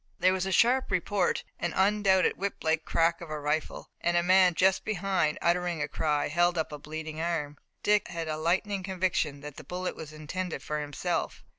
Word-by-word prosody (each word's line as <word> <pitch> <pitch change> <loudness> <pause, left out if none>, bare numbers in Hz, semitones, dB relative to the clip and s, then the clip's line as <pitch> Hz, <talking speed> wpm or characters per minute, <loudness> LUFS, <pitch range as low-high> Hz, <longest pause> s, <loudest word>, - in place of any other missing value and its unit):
There 185 +1 +3
was 190 0 -1
a - - -2
sharp 245 +7 +3
report, 185 0 0 0.2
the 175 -2 -2
undoubted 195 -1 +3
whip 200 +1 -4
like 160 0 +1
crack 165 +1 +1
of 170 - -8
a 155 0 -4
rifle, 150 +2 -2
and 175 0 +2
a 175 - +3
man 185 -1 +5
just 190 +2 +3
behind, 190 -6 0
uttering 175 -1 +1
a - - -1
cry, 150 -2 0
held 175 +3 +2
up 160 - -1
a 150 - -6
bleeding 155 +1 -6
arm. 155 -4 -2 0.3
Dick 210 0 +3
had 165 -1 -5
a 155 - -2
lightning 190 +5 0
conviction 180 -6 -1
that 145 -1 -9
the - - -9
bullet 180 +5 -4
was 155 -2 -8
intended 155 0 -5
for 150 0 -2
himself. 145 -1 -3
175 Hz, 195 wpm, -29 LUFS, 155-185 Hz, 0.3 s, man